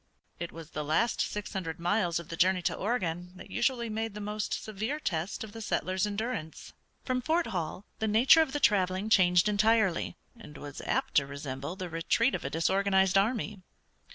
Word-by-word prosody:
It 170 - -4
was 160 -1 -10
the 150 - -3
last 160 +11 +1
six 210 -1 -3
hundred 165 -4 -3
miles 175 -1 +1
of 170 - -10
the 165 - -4
journey 185 +1 +3
to - - +1
Oregon 180 -5 -2
that - - -12
usually 240 -3 0
made 220 -1 -3
the - - -5
most 210 +1 -3
severe 220 +8 -3
test 175 - -2
of 220 - -8
the 225 +1 -8
settlers' 190 -2 0
endurance. 205 -6 -4 0.3
From 255 -1 0
Fort 325 +5 +1
Hall 180 -1 -4
the 220 - 0
nature 235 +9 +6
of 315 -4 0
the 290 - -1
traveling 195 -3 +2
changed 180 -2 +5
entirely, 210 -4 +2 0.2
and 185 -11 -12
was 145 -1 -8
apt - - 0
to 140 -1 +3
resemble 140 +2 -5
the 185 -1 -5
retreat 175 +9 +1
of - - -3
a 135 - -2
disorganized 190 +4 +2
army. 210 0 +1
195 Hz, 185 wpm, -30 LUFS, 170-220 Hz, 0.3 s, nature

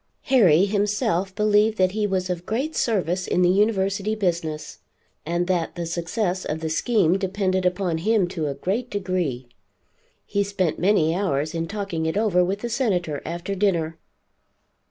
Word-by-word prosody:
Harry 195 - +5
himself 205 -2 0
believed 210 +1 +3
that 185 -1 +3
he 210 +1 0
was 185 -2 -1
of 180 -1 -4
great 270 +9 -2
service 185 -5 0
in 180 - +2
the 175 - +5
University 200 +1 +1
business, 165 -6 -2 0.5
and 175 +1 0
that 175 -3 -1
the 170 -1 -3
success 175 +3 -2
of 155 - -3
the 160 -1 -3
scheme 190 0 +2
depended 190 -1 0
upon 180 -3 -1
him 210 +1 +2
to 170 -4 -3
a 140 - -3
great 210 - -2
degree. 180 - -2 0.8
He 200 - 0
spent 195 -4 -1
many 175 -4 +3
hours 155 -6 -1
in 165 0 -2
talking 195 -6 -3
it 160 - -1
over 200 -5 +3
with 195 +3 -2
the 240 - -2
Senator 180 - -1
after 170 +4 -4
dinner. 170 -5 0
185 Hz, 160 wpm, -23 LUFS, 170-205 Hz, 0.8 s, Harry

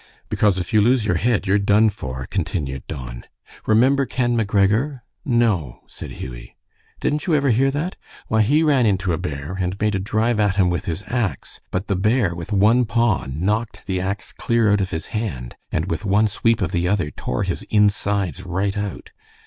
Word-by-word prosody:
"Because 105 -3 +2
if 90 +3 -4
you 105 - +5
lose 120 +1 +3
your 90 -5 +1
head 110 +1 +1
you're 100 +1 +3
done 105 +2 +4
for," 65 -9 -6
continued 65 -4 -2
Don. - - -7 0.4
"Remember 130 +5 +4
Ken 120 -1 0
McGregor?" 110 +5 +1 0.2
"No," 115 - 0
said - - -9
Hughie. - - -9 0.4
"Didn't 150 +3 -1
you 165 - +3
ever 140 -3 +2
hear 130 +4 +3
that? 150 +7 -3 0.3
Why, 110 0 +2
he 145 +9 +3
ran 140 -7 +3
into 95 -3 +1
a 80 - -2
bear, 75 0 -5
and 95 +1 -2
made 105 0 +1
a 95 - 0
drive 110 +3 0
at 100 -2 +2
him 95 -3 +3
with 85 +1 -2
his 95 +1 -3
axe, 110 - -3
but 95 +2 -2
the 100 - -1
bear, 105 0 +2
with 85 +4 -7
one 105 +5 +4
paw 115 - +1
knocked 105 - -2
the 95 -2 -1
axe 100 +2 -3
clear 115 -3 +1
out 105 - +2
of 95 - -2
his 80 -3 -4
hand, 85 - -4 0.2
and 80 - 0
with 80 +4 -2
one 105 +2 +3
sweep 115 +2 +1
of 90 - -2
the 90 -1 0
other 90 -6 0
tore 65 - -3
his - - -2
insides 100 -4 +1
right 95 +3 -1
out. 105 -3 -5
100 Hz, 195 wpm, -21 LUFS, 90-115 Hz, 0.4 s, you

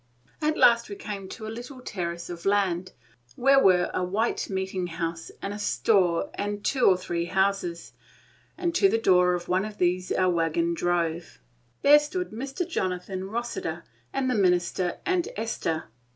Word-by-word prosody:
At 310 0 +1
last 235 -1 +5
we 200 - -5
came 195 -2 -6
to 220 - -8
a 215 - -5
little 250 +3 -8
terrace 170 -7 -4
of 170 -1 -8
land, 185 -3 +1 0.4
where 275 +2 +5
were 180 -2 +4
a 185 - 0
white 205 +6 -1
meeting 190 -1 -2
house, 165 -1 -4
and 200 - -3
a 205 - -6
store, 200 - +2
and 205 0 -4
two 260 -3 +3
or 185 - +5
three 170 -2 -3
houses, 190 -2 -1 0.6
and 345 -2 -1
to 390 +3 +4
the - - +2
door 180 -4 +4
of 175 0 -6
one 185 +1 +1
of 215 -1 -7
these 180 0 0
our 185 -1 +2
wagon 170 0 +1
drove. 170 -1 -1 0.5
There 295 +1 +8
stood 360 +5 -4
Mr. 270 - -4
Jonathan 185 - -3
Rossiter 215 -8 -4 0.3
and 270 -1 -1
the 255 - +1
minister 180 -3 +1
and 370 -2 +1
Esther. 165 - -3
190 Hz, 165 wpm, -26 LUFS, 175-235 Hz, 0.6 s, There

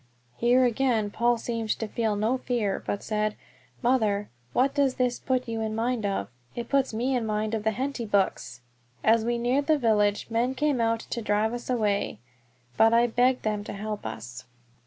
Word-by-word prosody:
Here 250 +2 +4
again 235 -3 +1
Paul 240 +2 +2
seemed 230 -1 -4
to 225 - -3
feel 220 -1 -1
no 220 +5 0
fear, 230 -7 -1
but 200 - -2
said, 215 -1 -1 0.5
"Mother, 215 -5 +1 0.2
what 265 - +2
does 280 -3 +2
this 250 -1 0
put 255 -1 -1
you 225 -1 -3
in 220 0 -2
mind 230 -1 0
of? 195 - -2 0.3
It 235 -1 -5
puts 275 -1 +2
me 245 +4 0
in 245 - 0
mind 215 0 -1
of 220 -2 -1
the 220 - +3
Henty 255 +2 -3
books!" 160 - 0 0.4
As 225 0 +4
we 240 +1 0
neared 250 +4 +1
the 310 -1 +4
village 210 -5 +2
men 240 +3 +1
came 285 -3 +1
out 230 0 +1
to 235 - -5
drive 215 +1 +1
us 245 +1 -6
away, 210 - 0 0.6
but 225 +1 +5
I 235 +1 +5
begged 250 +2 +2
them 210 -1 -1
to - - -6
help 210 +1 -5
us. 120 +3 -8
230 Hz, 190 wpm, -27 LUFS, 210-250 Hz, 0.6 s, but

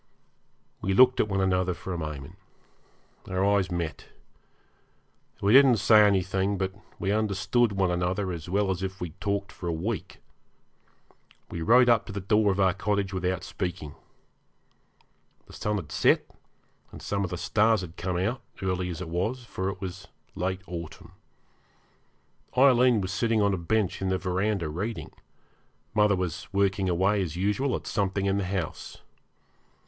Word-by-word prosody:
We 95 0 0
looked 130 +3 +6
at - - +3
one 95 -1 0
another 90 -1 +1
for 95 - -6
a - - -3
moment. 75 +1 -6 0.9
Our 95 +1 0
eyes 100 -2 +2
met. 85 -3 -4 1.4
We 100 +2 +4
didn't 135 -3 +7
say 110 +2 +6
anything; 95 0 +1
but 95 0 -2 0.2
we 95 - -1
understood 105 +2 +1
one 95 -2 +1
another 90 +2 -1
as 85 -1 -6
well 100 +1 +1
as 90 -1 -3
if 95 0 -4
we 90 - -4
had 80 - -21
talked 100 -1 -2
for 90 - -7
a - - 0
week. 90 +5 -4 1.3
We 85 - -4
rode 125 +8 +5
up 115 -3 +3
to - - -6
the 100 - -4
door 105 +2 +2
of 95 - -2
our 95 -2 +4
cottage 100 0 -1
without 90 -1 -1
speaking. 85 -6 -5 1.5
The - - -16
sun 105 0 -2
had 80 -7 -5
set, 75 - +3 0.7
and - - -10
some 100 -1 -2
of 95 - -2
the 90 - -4
stars 110 +5 +2
had 85 -3 -8
come 90 0 -2
out, 110 +8 -1 0.2
early 90 -1 -1
as 85 0 -5
it 90 - -5
was, 95 +10 -2
for 95 -4 -3
it 95 -1 -6
was 95 -1 -7 0.3
late 95 +1 -2
autumn. 85 -3 -8 1.5
Aileen 125 -4 +5
was 95 0 -3
sitting 115 0 +1
on 100 -1 +2
a - - +2
bench 95 +4 -1
in 95 - 0
the 95 - +1
verandah 95 0 -1
reading, 100 +9 -4 0.8
mother 105 -1 +4
was 90 -1 -4
working 100 -1 +1
away 95 +4 +2
as 85 -4 -3
usual 105 +9 0
at - - -6
something 100 -1 -1
in 100 0 +1
the 100 - -2
house. 95 -4 -4
95 Hz, 165 wpm, -27 LUFS, 90-105 Hz, 1.5 s, didn't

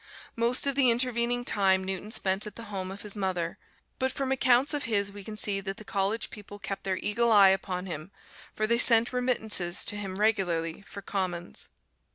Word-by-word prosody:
Most 235 +3 +1
of 280 - +2
the 265 -2 +4
intervening 240 0 0
time 190 -3 +3
Newton 190 +2 -4
spent 195 -2 +1
at 210 - -9
the 230 - -7
home 185 -1 -3
of 195 +1 -8
his 210 -1 -6
mother, 185 -4 -2 0.4
but 260 0 0
from 265 0 -3
accounts 260 +2 +3
of 295 - -2
his 200 -3 +1
we 200 0 -10
can 215 +1 -8
see 200 -1 -1
that 195 0 -5
the 215 - -11
College 200 +2 -1
people 205 -1 -11
kept 195 -1 -6
their 190 -1 -1
eagle 230 +4 0
eye 200 -3 +7
upon 190 -1 -1
him, 160 -1 -7 0.5
for 215 - 0
they 235 +2 +2
sent 235 0 +6
remittances 220 -8 +1
to - - +1
him 195 -2 -5
regularly 175 -6 0
for 200 0 -11
"commons." 185 -3 -3
205 Hz, 200 wpm, -28 LUFS, 190-235 Hz, 0.5 s, eye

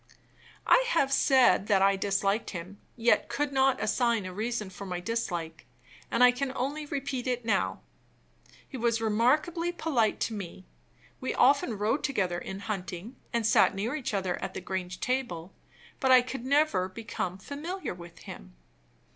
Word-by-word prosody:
I - - +5
have 280 - +2
said 255 -9 +4
that 195 -2 +4
I 195 0 +4
disliked 200 +2 0
him, 185 +2 -8 0.2
yet 235 0 +2
could 280 +4 -1
not 265 -2 +3
assign 225 0 +1
a 185 - -6
reason 215 -1 -3
for 190 - -9
my 180 -1 -3
dislike; 175 -6 -4 0.4
and 235 - +3
I 250 - +8
can 260 +2 -3
only 290 +4 -3
repeat 275 -3 -3
it 245 -2 -1
now. 205 -4 0 0.9
He 265 - -7
was 230 -1 +1
remarkably 285 +11 +1
polite 275 -11 0
to 225 - -1
me; 190 -2 -7 0.5
we 260 - -3
often 255 -4 +3
rode 220 +8 0
together 185 -11 0
in 190 +2 -7
hunting, 200 +2 -5 0.2
and 235 -1 0
sat 215 - +4
near 215 +7 -2
each 260 -8 -3
other 185 -2 -2
at - - -5
the - - -3
Grange 185 -1 -4
table; 220 -9 -2 0.5
but 265 - +1
I 255 -1 +8
could 255 -1 -6
never 275 -10 +2
become 185 -3 -4
familiar 305 - -5
with 170 -1 -12
him. - - -10
230 Hz, 165 wpm, -29 LUFS, 190-265 Hz, 0.9 s, I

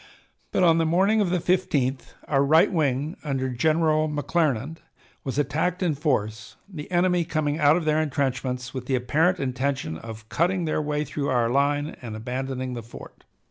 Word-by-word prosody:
But - - +2
on 165 -2 +5
the 165 - +2
morning 195 +6 +3
of 195 - +1
the 180 - +1
15th 145 -8 0
our 140 -2 +2
right 155 +4 +4
wing 150 -1 0
under 135 -3 -1
General 155 +4 +2
McClernand 150 -1 -1 0.5
was 135 0 -4
attacked 160 +6 0
in 170 -4 +2
force, 120 -7 -2
the 160 -7 -8
enemy 180 -1 +2
coming 155 -2 -1
out 150 0 +5
of 170 -2 -1
their 155 0 +2
intrenchments 130 -4 -2
with 130 -2 -6
the 130 - +1
apparent 160 +9 +1
intention 130 - -2
of 110 -1 -9
cutting 175 +6 0
their 155 -1 0
way 150 0 -1
through 140 0 -3
our 120 -2 +2
line 145 +2 +1
and 115 -4 -6
abandoning 130 +3 -4
the 120 - -5
fort. 115 - -13
145 Hz, 175 wpm, -25 LUFS, 130-160 Hz, 0.5 s, on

